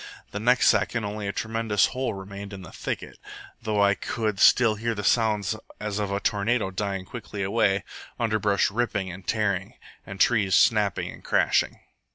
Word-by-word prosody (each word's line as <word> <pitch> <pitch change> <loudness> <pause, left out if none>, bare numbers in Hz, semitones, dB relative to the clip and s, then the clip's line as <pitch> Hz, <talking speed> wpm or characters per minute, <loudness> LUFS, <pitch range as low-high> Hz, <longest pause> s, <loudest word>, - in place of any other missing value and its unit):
The 105 - -4
next 125 +3 +3
second 115 -3 +1
only 105 0 -4
a - - -1
tremendous 110 -1 +1
hole 130 -4 -2
remained 100 +1 -8
in 95 -1 -8
the 90 - -11
thicket, - - -5 0.4
though 105 -2 +1
I 100 0 +5
could 105 -1 -3
still 115 -3 +6
hear 115 +2 -2
the 105 - -4
sounds 110 -2 +2 0.2
as 105 -1 -3
of 100 -1 -2
a 100 - 0
tornado 105 0 0
dying 95 -1 -3
quickly 105 -2 -6
away, 95 -1 +1 0.4
underbrush 110 -4 +1
ripping 105 -4 -1
and 95 +1 -11
tearing, 100 -4 -1 0.3
and 100 0 -9
trees 100 -6 +3
snapping 105 -5 +3
and - - -13
crashing. - - +1
105 Hz, 170 wpm, -25 LUFS, 100-110 Hz, 0.4 s, still